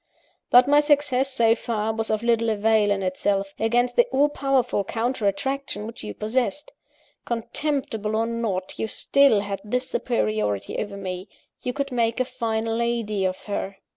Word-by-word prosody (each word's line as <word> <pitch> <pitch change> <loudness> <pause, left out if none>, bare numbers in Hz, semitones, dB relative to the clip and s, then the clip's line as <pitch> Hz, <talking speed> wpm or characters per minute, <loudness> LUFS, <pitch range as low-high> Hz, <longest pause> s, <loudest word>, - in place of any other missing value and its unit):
"But 250 +1 +7
my 290 +1 +6
success, 290 -3 +2
so 230 -3 +4
far, 220 -2 -2
was 225 0 -2
of 215 +1 0
little 230 -1 +2
avail, 215 0 +3
in 200 -1 0
itself; 195 +1 -1
against 240 +2 +1
the 485 - +5
all 290 - +2
powerful 270 -7 +1
counter 230 +2 -1
attraction 265 +2 -2
which 230 +1 -9
you 105 -1 -6
possessed. 260 - -1 0.5
Contemptible, 235 -2 -2
or 225 +1 +1
not, 225 -5 -3
you 220 - -1
still 275 -1 +3
had 200 -1 -4
this 250 +5 -2
superiority 105 - -1
over 205 -1 -4
me 185 0 -5 0.3
you 250 - -2
could 280 +1 -3
make 230 -1 0
a 255 - +2
fine 230 -3 -2
lady 225 -3 -1
of 185 0 -2
her. 195 -1 -4
225 Hz, 165 wpm, -24 LUFS, 205-255 Hz, 0.5 s, But